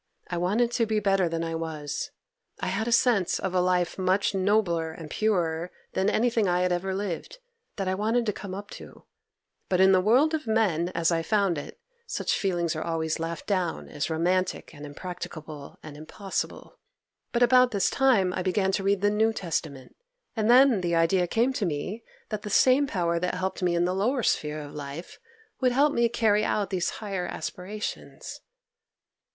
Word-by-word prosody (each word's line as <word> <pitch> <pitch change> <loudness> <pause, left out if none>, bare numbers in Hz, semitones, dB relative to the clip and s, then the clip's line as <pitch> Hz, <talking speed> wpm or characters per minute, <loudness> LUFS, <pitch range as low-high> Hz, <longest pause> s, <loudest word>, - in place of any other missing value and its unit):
I 175 - -1
wanted 215 +7 +1
to 235 -1 +1
be 215 -1 +1
better 195 -3 +2
than 165 0 -2
I 165 0 -3
was; 155 -3 -4 0.5
I - - -2
had 225 - -1
a - - -1
sense 220 -6 +3
of 190 -1 -3
a 180 - +3
life 180 0 0
much 190 +2 +1
nobler 185 -4 +1
and 160 -1 -10
purer 175 -5 0 0.2
than 190 +2 +1
anything 230 -2 +2
I 180 0 +2
had 180 0 +1
ever 190 +2 -1
lived, 200 - -4 0.4
that 195 -2 -3
I 185 - +1
wanted 225 +5 0
to 210 - 0
come 190 -1 -7
up 205 +1 -8
to. - - -11 0.7
But 180 - +1
in 190 0 +6
the 185 -1 +5
world 255 - +4
of 310 -6 -2
men, 195 -7 +1
as 170 0 +2
I 165 -1 +1
found 195 -2 +1
it, - - -10 0.3
such 445 - -1
feelings 175 -4 0
are 155 - -3
always 160 -1 -2
laughed 165 0 -4
down 185 -5 -1
as 145 +1 -3
romantic 180 +2 -1
and 145 -1 -9
impracticable 155 -2 -8
and 155 -2 -9
impossible. 175 +6 -5 0.5
But 240 0 +2
about 250 +1 +6
this 200 -5 +1
time 225 -10 +3
I 185 - -2
began 190 +1 +1
to 195 0 -1
read 200 0 +1
the 205 0 +3
New 220 +2 +2
Testament, 160 -9 -4 0.4
and 220 -1 0
then 250 -4 +6
the 170 -1 0
idea 175 +2 +3
came 235 +8 +1
to 220 - -1
me 185 +9 -4 0.3
that 215 -2 -3
the 210 - -6
same 260 +7 +4
Power 170 -7 0
that 180 +1 -1
helped 185 +1 -3
me 175 -1 +1
in 170 0 +2
the 180 - 0
lower 235 +7 0
sphere 150 -4 0
of 145 -1 -9
life 145 +3 -8 0.4
would 255 -2 +2
help 285 +3 +3
me 235 0 +2
carry 220 -3 +2
out 210 -1 -1
these 180 -2 0
higher 195 -4 -3
aspirations. 205 +4 -6
190 Hz, 190 wpm, -27 LUFS, 170-215 Hz, 0.7 s, in